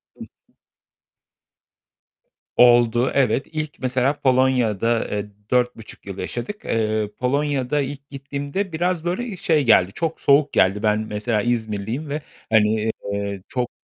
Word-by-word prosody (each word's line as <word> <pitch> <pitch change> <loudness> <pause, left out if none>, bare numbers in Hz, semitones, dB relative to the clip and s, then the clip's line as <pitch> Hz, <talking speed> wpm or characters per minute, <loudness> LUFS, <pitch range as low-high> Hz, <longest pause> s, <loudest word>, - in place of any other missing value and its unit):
Hı - - -26
hı. - - -20 2.0
Oldu, 120 0 +5
evet. 135 0 +1
İlk 155 -2 -5
mesela 130 +3 0
Polonya'da, 125 -4 +2
eee, 105 -1 -1 0.3
4.5 125 -3 -1
yıl 100 -1 -7
yaşadık. 120 - -5
Eee, 110 -2 0
Polonya'da 140 +1 0
ilk 140 +1 -6
gittiğimde 140 +7 -4
biraz 175 +1 -1
böyle, 180 +8 -1
eee, 210 -7 -6
şey 155 -4 +2
geldi. 95 -5 +4
Çok 165 -1 -3
soğuk 140 +1 +4
geldi. 100 +3 +2
Ben 105 0 +2
mesela 105 0 -1
İzmirliyim 115 +4 -2
ve, 150 +1 -3 0.3
hani, 110 0 +3 0.2
eee, 100 -1 -3
çok 125 -1 -2
125 Hz, 130 wpm, -22 LUFS, 110-145 Hz, 2.0 s, Oldu